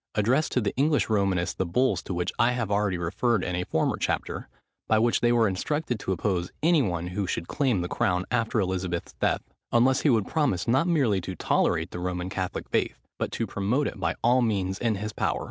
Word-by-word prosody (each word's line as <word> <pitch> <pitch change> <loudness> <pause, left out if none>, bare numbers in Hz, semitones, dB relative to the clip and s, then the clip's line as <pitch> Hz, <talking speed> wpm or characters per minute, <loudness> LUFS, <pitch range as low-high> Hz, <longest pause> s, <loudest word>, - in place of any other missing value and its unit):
addressed 125 +9 +2
to - - +2
the 105 -4 -2
English 145 0 +2
Romanists 95 -4 +1
the - - -1
bulls 125 +9 +1
to - - -8
which 90 0 -2
I 120 +1 +4
have 120 -5 -2
already 100 -2 +1
referred 95 +5 0
in 90 - -2
a 90 - -1
former 80 - 0
chapter; - - -2 0.4
by 110 - +3
which 115 +2 +3
they 120 - +3
were 115 -2 +4
instructed 125 +6 -2
to 95 - -3
oppose 90 -1 -1
any 165 -1 +5
one 90 -7 -1
who 95 +1 -2
should 85 - -3
claim 125 -10 +1
the 90 - -2
crown 90 0 0
after 115 -2 +1
Elizabeth's 90 -3 -2
death, - - +1 0.3
unless 130 +3 +4
he 150 - +3
would 110 -6 +3
promise 145 - 0
not 135 +9 +3
merely 130 - +2
to 95 +1 -6
tolerate 80 +1 +1
the 90 - -5
Roman 90 +1 -3
Catholic 95 -1 -3
faith, - - 0 0.2
but - - -2
to 115 - -1
promote 110 +8 0
it - - -4
by - - 0
all 125 +2 +4
means 95 -4 0
in 115 -3 +1
his 105 +2 -4
power. - - -1
105 Hz, 215 wpm, -26 LUFS, 90-125 Hz, 0.4 s, any